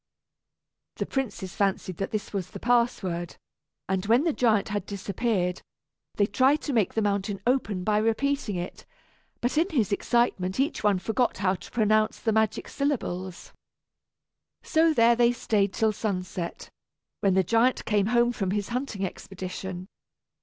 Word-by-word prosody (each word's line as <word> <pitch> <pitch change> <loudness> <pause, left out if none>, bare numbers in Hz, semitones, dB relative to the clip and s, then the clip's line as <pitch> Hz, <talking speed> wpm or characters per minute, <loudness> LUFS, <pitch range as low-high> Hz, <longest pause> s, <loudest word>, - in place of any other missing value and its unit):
The - - -2
princes 225 -8 -3
fancied 190 -3 -1
that 195 - -2
this 215 -3 -2
last - - -22
was 190 -3 -3
the - - -9
password, 225 -8 0 0.5
and 190 -1 0
when 235 +6 +4
the 330 -2 +1
giant 220 -6 +2
had 205 -1 -3
disappeared 200 -2 -1 0.5
they 205 - +3
tried 260 +9 +3
to 285 - -2
make 220 -6 +1
the 220 - +1
mountain 200 -1 -1
open 225 -7 0
by 210 +2 +2
repeating 225 +1 0
it; 175 0 -6 0.5
but 250 +6 +1
in 345 +4 +2
his 235 - 0
excitement 200 -3 +1
each 285 +4 0
one 205 -2 +3
forgot 225 +6 0
how 185 -1 +1
to 190 - -9
pronounce 215 -1 +2
the 225 - 0
magic 220 -1 +1
syllables. 190 -11 -3 1.1
So 325 +1 +3
there 235 -5 +5
they 240 0 +4
stayed 205 -4 +1
till 220 +2 +1
sunset, 185 -4 -4 0.5
when 195 -3 +2
the 190 - +4
giant 230 +7 +2
came 205 -2 +2
home 240 +1 +3
from 195 -5 -2
his 205 +1 -1
hunting 240 -5 -2
expedition. 185 0 -6
210 Hz, 155 wpm, -27 LUFS, 190-240 Hz, 1.1 s, there